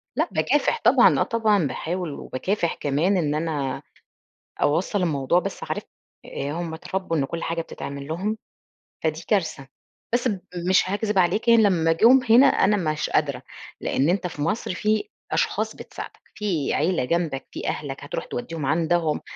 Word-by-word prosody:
لأ، - - +1
باكافح 465 - +1
طبعًا، - - +6
آه - - +4
طبعًا 215 -7 +2
باحاول 170 +4 -3
وباكافح 170 +7 -2
كمان 155 +8 +1
إن 150 -4 0
أنا 150 -4 -2 0.8
أوصّل 170 +7 +1
الموضوع، 150 0 +2
بس - - -5
عارف - - -3 0.4
آآ 140 +1 -4
هم 165 0 -4
اتربوا 165 0 -3
إن 140 - +1
كل 165 +4 -5
حاجة 165 0 -1
بتتعمل 140 -3 -7
لهم 195 +7 -2 0.7
فدي 160 +1 -1
كارثة، 160 -9 0 0.5
بس 245 +1 +2
ب 200 -5 -1 0.3
مش 185 0 +4
هاكذب 205 0 0
عليك 185 +6 +1
يعني 230 -1 +6
لمّا 165 -5 +3
جُم 230 +11 +6
هنا 240 +5 +8
أنا 210 -5 +3
مش 150 - -2
قادرة، - - 0 0.4
لإن 140 +5 +1
أنت 185 0 +1
في 160 -4 -7
مصر 185 +3 -1
في 215 - 0 0.2
أشخاص - - 0
بتساعدك، - - -9 0.2
في 180 -9 -1
عيلة 165 -4 +1
جنبك، 165 -2 -1
في - - -5
أهلك - - -4
هتروح - - -4
تودّيهم 155 +4 -5
عندهم، 160 +1 +1
170 Hz, 160 wpm, -24 LUFS, 155-200 Hz, 0.8 s, هنا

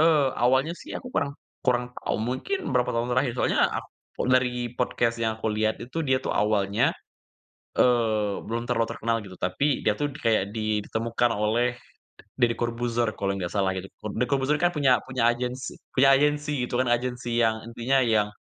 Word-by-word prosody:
E 160 - +6 0.4
awalnya 130 +6 +3
sih - - -11
aku 250 - -9
kurang 140 0 0 0.3
kurang 125 -1 +2
tahu, - - -2
mungkin 380 - -2 0.2
berapa 125 - +2
tahun 115 +1 -1
terakhir. 130 -1 +2
Soalnya, - - +2 0.2
ak - - -14 0.4
dari 125 -1 +2
podcast 120 -1 0
yang 115 -1 0
aku - - 0
lihat 110 0 0
itu 155 +7 -4
dia 130 -1 +2
tuh - - -5
awalnya, 105 -1 +2 0.9
eee, 110 -4 +2
belum 115 +1 -3
terlalu 115 -2 +1
terkenal 115 +1 -1
gitu, 95 -2 -11
tapi 135 +11 0
dia 105 - +4
itu 145 +5 -2
kayak 110 -6 +1
di 110 -1 -1
ditemukan 115 +3 0
oleh 120 +4 +1 0.6
Deddy 120 -2 +3
Corbuzier 120 -1 -1
kalau 100 -1 0
nggak 90 -3 -3
salah 95 -2 0
gitu, 95 +1 -6 0.2
Deddy 125 - -1
Corbuzier 140 +2 +1
kan 175 - +4
punya 135 -8 +3
punya 130 -3 0
agensi 125 +1 -1 0.2
punya 135 +1 +5
agensi 150 +1 +1 0.2
gitu 120 - -1
kan, 130 - +2
agensi 120 0 0
yang 110 0 0
intinya 120 +3 0
yang 110 -5 +3
120 Hz, 175 wpm, -26 LUFS, 110-130 Hz, 0.9 s, E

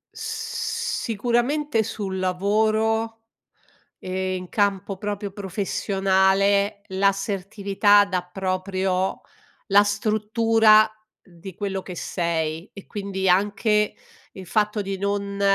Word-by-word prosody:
Sicuramente 445 - -1
sul 200 -3 -4
lavoro, 220 +4 0 0.8
e 185 0 -3
in 185 0 -6
campo 200 -2 0
proprio 205 0 -4
professionale, 195 +1 +1
l'assertività 200 +1 +2
dà 185 -3 -1
proprio 185 0 -1 0.5
la 200 -1 +6
struttura 215 +1 +3 0.3
di 180 0 -12
quello 195 -1 -3
che 180 -1 -8
sei, 165 0 -2
e 200 - -11
quindi 195 -2 -3
anche 205 +3 +2 0.4
il 190 - -9
fatto 210 +2 0
di 195 -1 -4
non 200 0 -2
200 Hz, 95 wpm, -23 LUFS, 190-215 Hz, 0.8 s, la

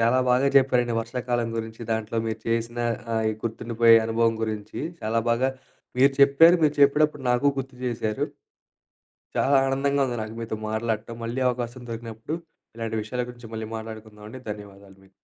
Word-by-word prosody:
చాలా 115 +3 +4
బాగా 130 +3 +4
చెప్పారండి 125 -3 +3
వర్షాకాలం 120 0 -2
గురించి, 110 0 -5
దాంట్లో 110 0 -2
మీరు 110 0 -3
చేసిన 115 +1 -1 0.4
ఆహ్, 110 -1 +1
గుర్తుండిపోయే 115 0 +4
అనుభవం 115 0 +2
గురించి. 110 -1 -4 0.2
చాలా 115 +1 0
బాగా 125 +3 +2 0.5
మీరు 135 +1 +6
చెప్పారు. 160 +6 +7
మీరు 150 -1 +3
చెప్పేటప్పుడు 150 0 +4
నాకు 125 +4 +2
గుర్తు 130 -1 -5
జేశారు. 110 -3 -1 1.1
చాలా 140 0 +3
ఆనందంగా 140 +1 +1
ఉంది 120 - -3
నాకు 110 +1 -6
మీతో 110 -1 -4
మాట్లాడటం. 110 0 -2
మళ్ళీ 120 +3 -3
అవకాశం 120 0 -3
దొరికినప్పుడు, 115 +6 -5 0.4
ఇలాంటి 115 -1 -3
విషయాల 125 +3 -3
గురించి 120 -2 -12
మళ్ళీ 110 -1 -4
మాట్లాడుకుందాం 110 -1 -9
అండి. 130 +4 -9
ధన్యవాదాలు 100 -2 -10
మీకు. 95 - -22
115 Hz, 150 wpm, -25 LUFS, 110-130 Hz, 1.1 s, చెప్పారు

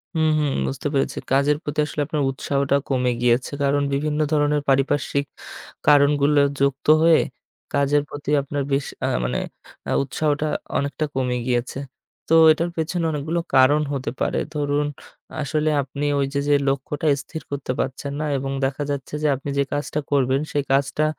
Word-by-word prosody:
হুম, 160 -1 +3
হুম, 150 -2 +1 0.2
বুঝতে 65 - -3
পেরেছি। 135 - 0
কাজের 140 +2 +3
প্রতি 145 +1 -3
আসলে 150 0 -3
আপনার 150 0 -2
উৎসাহটা 140 +1 0
কমে 125 -2 +1
গিয়েছে। 120 +1 +2
কারণ 140 +1 +2
বিভিন্ন 150 +2 -1
ধরনের 150 -1 +2
পারিপার্শ্বিক 140 +1 +1 0.6
কারণগুলো 145 0 +5 0.2
যুক্ত 140 0 0 0.2
হয়ে 165 -1 +6 0.5
কাজের 140 +1 +3
প্রতি 145 0 -7
আপনার 140 +1 -3
বেশ 140 0 +1 0.2
আ - - +1 0.2
মানে - - -1 0.5
আ - - 0
উৎসাহটা 150 +2 -1 0.3
অনেকটা 145 +2 -1
কমে 125 -2 0
গিয়েছে। 125 +1 -1 0.5
তো - - +3 0.2
এটার 165 +2 0
পেছনে 165 +2 -1
অনেকগুলো 155 +3 -2 0.2
কারণ 135 +3 +5
হতে 130 -4 -3
পারে। - - +1 0.2
ধরুন 145 0 0 0.5
আসলে 155 +1 0
আপনি 140 +2 -4
ওইযে 140 +1 -1
যে 145 - +5
লক্ষ্যটা 145 +4 -2 0.2
স্থির 160 - -7
করতে 140 -2 -3
পারছেন 135 +2 -3
না 155 - -1
এবং 135 0 -3
দেখা 135 +2 -2
যাচ্ছে 140 0 -5
যে - - +3
আপনি 135 +2 -7
যে 140 - +3
কাজটা 145 +1 -2
করবেন, 135 -1 +2
সেই 145 - 0
কাজটা 140 +2 +1
140 Hz, 160 wpm, -22 LUFS, 135-150 Hz, 0.6 s, হয়ে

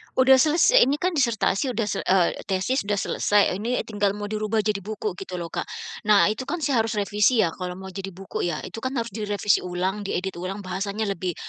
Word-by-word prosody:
Udah 260 0 +6
selesai, 330 - +5
ini 280 - +2
kan 360 +5 0
disertasi 250 - +1
sudah 230 -3 -1 0.2
eee, 185 -2 +4 0.2
tesis 195 +8 0
sudah 205 0 0
selesai, 205 0 +2
ini 235 +4 -1
tinggal 205 -2 -1
mau 205 0 -5
dirubah 215 0 -1
jadi 210 -1 0
buku 210 -1 -5
gitu 185 -1 -6
lho, 170 -2 -5
Kak. - - -3 0.4
Nah, 210 0 +5
itu 235 +4 -5
kan 345 -2 -3
saya 270 -5 +2
harus 225 - -3
revisi 210 +3 +3
ya, 170 - 0
kalau 180 +1 -6
mau 190 +1 -9
jadi 195 0 -6
buku 190 -1 -4
ya, 170 -3 -3
itu - - -8
kan 260 +3 -3
harus 235 -2 -2
direvisi 205 0 +1
ulang, 185 +3 -3
diedit 190 -1 -3
ulang, 195 +3 -5
bahasanya 200 +3 -3
lebih 185 -3 -3
205 Hz, 210 wpm, -24 LUFS, 190-230 Hz, 0.4 s, Udah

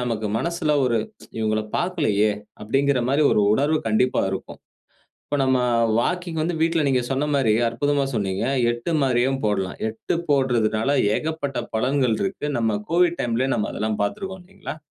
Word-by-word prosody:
நமக்கு 115 -3 -2
மனசுல 170 0 -1
ஒரு 120 -2 +1 0.4
இவங்கள 110 -1 +1 0.2
பார்க்கலயே 145 - +1 0.3
அப்டிங்குற 135 +5 +1
மாரி 140 +3 +3
ஒரு - - +3
உணர்வு 145 +7 +2
கண்டிப்பா 120 +4 +2
இருக்கும். 95 - -6 0.7
இப்ப 145 - -2
நம்ம 130 -1 +2 0.4
வாக்கிங் 175 +3 -2
வந்து 170 +2 -1
வீட்ல 165 0 +2
நீங்க 130 -2 +2
சொன்ன 135 +3 0
மாரி 130 -6 +3
அற்புதமா 140 +5 0
சொன்னீங்க. 100 -3 -1 0.3
8 120 +8 -4
மாரியும் 130 0 +1
போடலாம். 95 -3 -1
8 110 0 -4
போடுறதனால 120 -5 +1 0.3
ஏகப்பட்ட 155 -4 -3 0.2
பலன்கள் 130 +2 +1
இருக்கு. 195 -6 -2
நம்ம் 110 -3 0
கோவிட் 175 0 +3
டைம்லயே 120 +2 0
நம்ம் 105 - -1
அதெல்லாம் 110 0 -2
பார்த்துருக்கிறோம். 190 - -5
130 Hz, 140 wpm, -23 LUFS, 110-155 Hz, 0.7 s, மாரி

